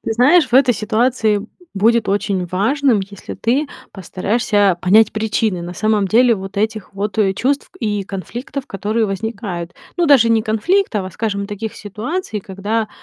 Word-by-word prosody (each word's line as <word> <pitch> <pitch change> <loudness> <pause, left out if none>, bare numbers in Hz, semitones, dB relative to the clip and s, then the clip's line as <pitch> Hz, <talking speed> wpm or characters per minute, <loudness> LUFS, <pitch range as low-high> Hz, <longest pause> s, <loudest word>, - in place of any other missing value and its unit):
ты 225 - -1
знаешь, 285 +9 +5
в - - -4
этой 260 -1 +6
ситуации 220 -1 +1 0.3
будет 225 +3 +2
очень 195 -2 0
важным, 225 - +1
если 195 0 -8
ты 275 +6 0 0.2
постараешься 205 +1 0
понять 215 +4 +5
причины, 215 -4 -1
на 175 +1 -7
самом 210 -1 +1
деле, 235 +3 +5
вот 195 0 -8
этих 215 -1 -2
вот 205 +2 -3 0.2
чувств 280 +3 -1
и 210 -3 -1
конфликтов, 240 +8 -6
которые 215 +3 -1
возникают. 195 -4 -4 0.2
Но 345 -2 +2
даже 265 -6 +6
не 225 -1 +3
конфликтов, 220 - 0
а, 185 - -6
скажем, 200 0 -3
таких 210 +1 -6
ситуаций, 220 - -4
когда, 205 +4 -3
215 Hz, 150 wpm, -18 LUFS, 200-235 Hz, 0.3 s, этой